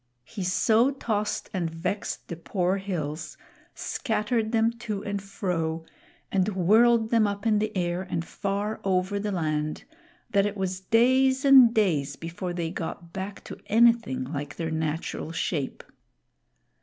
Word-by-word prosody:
He 200 - -6
so 220 +7 +3
tossed 220 -6 -2
and 175 -4 -1
vexed 180 +5 -4
the 170 - -5
poor 180 +2 -1
hills, 170 -6 -4 0.4
scattered 220 -2 -1
them 225 0 +3
to 215 -4 -4
and 200 -1 -3
fro, 165 -5 -3 0.5
and 190 +1 +2
whirled 220 +5 +4
them 225 -3 +4
up 200 +1 -4
in 215 -2 +3
the 215 0 -1
air 175 0 0
and 175 -3 -3
far 200 +4 -3
over 190 +1 0
the 210 +1 -2
land, 155 -4 -2 0.5
that 200 0 +3
it 205 0 -5
was 185 -1 -2
days 260 +6 +3
and 265 -4 +8
days 160 -11 +1
before 170 +2 -5
they 170 -2 -3
got 170 0 -6
hack 195 +1 -5
to - - -9
anything 230 - +3
like 145 +1 -5
their 165 -1 -3
natural 160 0 -3
shape. 155 -3 -2
195 Hz, 145 wpm, -26 LUFS, 165-220 Hz, 0.5 s, and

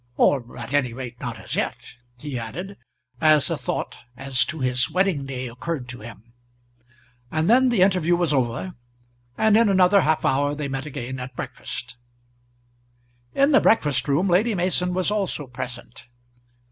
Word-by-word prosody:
Or 125 -4 +2
at 120 +2 -7
any 130 -5 +1
rate, 125 -1 -7
not 120 -2 -5
as - - -5
yet," - - -3 0.2
he 145 +1 -6
added, 175 - -6 0.5
as 155 -3 +4
a - - +1
thought - - -4 0.2
as 135 0 +1
to 160 - -6
his 130 0 +1
wedding 175 -5 0
day 130 -1 -4
occurred 125 +3 -5
to 120 - -7
him. 115 +1 -12 1.0
And 155 +3 0
then 255 +3 +5
the 220 -7 +4
interview 180 -3 +3
was 170 -4 +1
over, 130 +7 -1 0.6
and 220 -1 +4
in 225 -1 +5
another 190 +1 +5
half 155 -1 +1
hour 145 +2 +1
they 150 -1 -3
met 135 +1 -4
again 130 -2 -5
at 125 +1 -7
breakfast. 125 +1 -6 1.4
In 275 +2 +4
the 275 - +6
breakfast 150 - +2
room 145 +7 +2
Lady 200 +5 +2
Mason 180 0 0
was 185 +2 +1
also 195 -8 -1
present. 125 -1 -8
145 Hz, 160 wpm, -23 LUFS, 125-185 Hz, 1.4 s, the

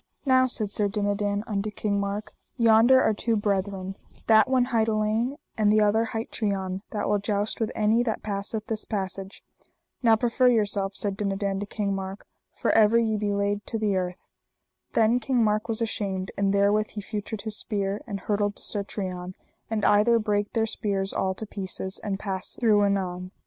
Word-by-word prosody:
Now, 260 -1 +4
said 215 -5 -2
Sir 205 0 +2
Dinadan 205 0 -1
unto 210 -1 -2
King 205 -1 -1
Mark, 200 +1 -3 0.2
yonder 230 +2 +6
are 220 - +3
two 230 +2 0
brethren, 195 -2 -1 0.3
that 220 +2 +5
one 255 -2 +3
hight 225 -1 +3
Alein, 220 +4 0 0.2
and 215 -2 +3
the 215 0 +4
other 215 +2 +3
hight 225 0 -5
Trian, 190 -3 -2
that 210 - -2
will 205 0 +2
joust 205 +1 -1
with 225 - -1
any 220 +2 +3
that 230 -3 -2
passeth 210 +1 -3
this 220 -1 -2
passage. 195 -1 -4 0.6
Now 230 -3 +5
proffer 240 +2 +2
yourself, 205 -4 +1
said 200 -2 0
Dinadan 195 -1 -1
to 205 - -4
King 200 -1 -2
Mark, 195 +1 -5 0.3
for - - +2
ever 220 +1 +5
ye 225 -2 +2
be 205 -1 -1
laid 200 0 0
to 225 - -2
the 210 -3 0
earth. 180 -1 -3 0.7
Then 230 +2 +3
King 250 0 +1
Mark 215 0 +1
was 225 +1 0
ashamed, 195 -4 -2
and 200 -1 +1
therewith 205 +2 +3
he 210 - -7
feutred 210 0 -5
his 220 -1 -1
spear, 200 -1 -2
and 200 -4 -5
hurtled 205 0 0
to - - -1
Sir 205 -2 -1
Trian, 185 -2 -5 0.3
and 220 -2 -1
either 210 +3 +5
brake 210 -2 -1
their 225 -1 +2
spears 200 -3 -2
all 190 0 -1
to 220 - -4
pieces, 190 -2 -4
and 200 -2 -2
passed 195 -2 -4
through 215 -4 +4
anon. 185 -2 -1
210 Hz, 185 wpm, -26 LUFS, 200-220 Hz, 0.7 s, yonder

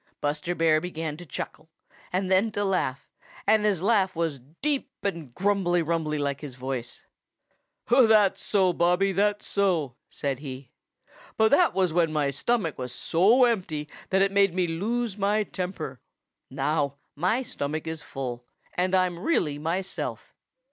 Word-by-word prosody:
Buster 150 +4 -1
Bear 160 -2 +3
began 160 -4 -4
to 175 0 -11
chuckle 155 +3 -6 0.4
and 185 +1 -1
then 195 +4 +4
to 205 0 0
laugh, 180 -9 -1 0.3
and 215 0 +4
his 200 -5 +1
laugh 200 -4 +2
was 165 -4 -1
deep 265 - -3
and 170 -9 -3
grumbly 185 -3 +2
rumbly 160 -2 -1
like 140 -1 -2
his 140 -4 -7
voice. 130 -2 -5 0.8
"That's 220 -6 +5
so, 190 -3 +2
Bobby! 180 +3 +2
That's 205 +2 +1
so!" 170 -11 0
said 135 -2 -3
he. 135 -3 -8 0.7
"But 220 0 +4
that 345 +4 +4
was 185 -4 +2
when 165 -2 +2
my 150 -2 +1
stomach 165 - -1
was 125 -1 -4
so 205 +10 +4
empty 180 -11 0 0.2
that 190 0 +4
it 195 - +2
made 200 -3 +3
me 185 -1 +2
lose 210 +6 -2
my 205 +2 +2
temper. 180 -10 -5 0.5
Now 140 +1 0 0.2
my 185 - +1
stomach 155 - -4
is 160 -1 -4
full, 125 -4 -5 0.3
and 185 +1 +1
I'm 180 -2 +1
really 165 - 0
myself. 175 +5 -3
175 Hz, 150 wpm, -26 LUFS, 150-200 Hz, 0.8 s, That's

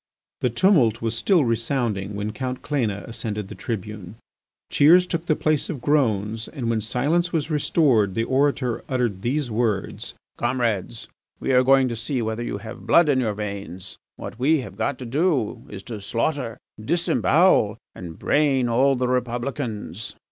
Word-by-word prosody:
The 125 - +1
tumult 120 - +3
was 115 0 -1
still 160 - +3
resounding 115 -4 -1
when 105 +1 -3
Count 130 +1 -4
Cléna 115 -9 -2
ascended 105 -3 -4
the - - -7
tribune. 105 -3 -6 0.6
Cheers 175 +5 +6
took 170 -1 -3
the 155 - +3
place 155 -1 0
of 150 - -4
groans 115 -6 0
and 120 -6 -3
when 110 -1 0
silence 150 +11 0
was 160 -1 -1
restored 130 - +2
the 115 - +1
orator 130 -1 0
uttered 120 -7 -1
these 130 +2 -1
words: 110 -3 -2 0.2
"Comrades, 120 -3 -1 0.3
we - - -1
are 125 -1 +5
going 135 0 +5
to 120 - -3
see 115 +4 -3
whether 110 0 -2
you 120 - -3
have 110 +3 -10
blood 170 -3 +5
in 135 -2 +3
your 110 -5 -1
veins. 100 -3 -6 0.2
What - - -8
we 145 +3 +3
have - - -9
got 140 -2 -1
to 125 - -7
do 140 - 0
is 95 -2 -8
to 110 -4 -7
slaughter, 115 +2 -2 0.3
disembowel, 170 - +3 0.2
and 85 -3 -9
brain 140 -4 +2
all 135 +4 +3
the 125 0 0
Republicans." 120 - -3
120 Hz, 160 wpm, -23 LUFS, 110-140 Hz, 0.6 s, Cheers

